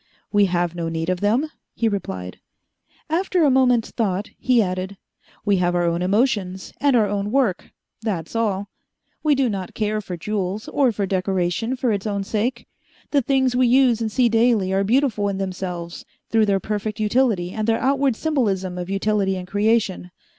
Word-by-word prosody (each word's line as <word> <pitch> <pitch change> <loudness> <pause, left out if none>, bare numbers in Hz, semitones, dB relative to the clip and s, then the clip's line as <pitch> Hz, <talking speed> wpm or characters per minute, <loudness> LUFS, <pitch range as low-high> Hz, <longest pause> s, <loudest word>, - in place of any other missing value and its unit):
"We 205 -1 +4
have 175 -2 0
no 170 -1 -3
need 165 +1 -2
of 185 -1 0
them," 235 - +1 0.2
he 230 - +1
replied. 95 - -4 0.7
After 355 +2 +1
a 290 - +5
moment's 250 -3 +3
thought, 205 -3 -2
he 255 -2 +3
added, 190 -1 -1 0.5
"We 200 -2 +3
have 175 -1 +1
our 175 - +2
own 170 0 0
emotions, 195 -2 0
and 280 -2 +4
our 225 -3 +4
own 200 0 -2
work 235 -7 0 0.3
that's 195 -5 -3
all. 205 -3 -1 0.5
We 300 -2 +3
do 270 -1 +2
not 195 -5 -4
care 215 0 -1
for 180 -3 -6
jewels, 200 +2 -3
or 270 -4 +2
for 205 -2 -2
decoration 190 +4 -1
for 250 -2 0
its 205 0 -2
own 200 -1 -1
sake. 225 +4 -2 0.5
The 285 - +3
things 260 -1 +1
we 250 0 +4
use 245 -2 +4
and 220 -1 -1
see 245 +3 +3
daily 225 -4 +2
are 195 +1 +2
beautiful 220 -2 +1
in 195 - -3
themselves, 180 -3 -5 0.3
through 220 -1 +3
their 195 -1 +2
perfect 210 +2 -3
utility 215 -5 +1
and 215 +1 -3
their 225 0 +3
outward 270 0 +1
symbolism 200 - -1
of 180 +1 -5
utility 195 -1 0
and 180 -1 -7
creation. 205 -2 +1
210 Hz, 180 wpm, -22 LUFS, 185-240 Hz, 0.7 s, a